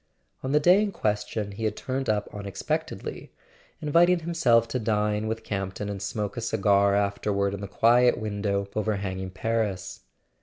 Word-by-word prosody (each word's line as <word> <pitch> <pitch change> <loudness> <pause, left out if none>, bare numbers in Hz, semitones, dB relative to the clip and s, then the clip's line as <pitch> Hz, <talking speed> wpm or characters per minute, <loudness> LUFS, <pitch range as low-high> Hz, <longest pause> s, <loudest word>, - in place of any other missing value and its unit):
On 130 - -3
the 150 - +4
day 180 +6 +5
in 210 -1 0
question 105 - -2
he 110 +3 -4
had 105 -1 0
turned 130 -1 -3
up 105 -1 +1
unex¬ 100 -2 -7
pectedly, - - -3 0.5
inviting 170 +3 +4
himself 125 -9 +3
to 125 - -1
dine 105 -1 0
with 110 0 -3
Camp 95 -3 -3
ton 105 - -4
and 100 -2 -5
smoke 100 +1 -3
a 120 - -4
cigar 100 -3 +3
afterward 100 0 0
in 100 - -5
the 100 - -4
quiet 120 +4 +4
window 100 -2 -1
over¬ 110 -1 0
hanging 95 -1 -4
Paris. 95 -2 -2
105 Hz, 175 wpm, -26 LUFS, 100-115 Hz, 0.5 s, day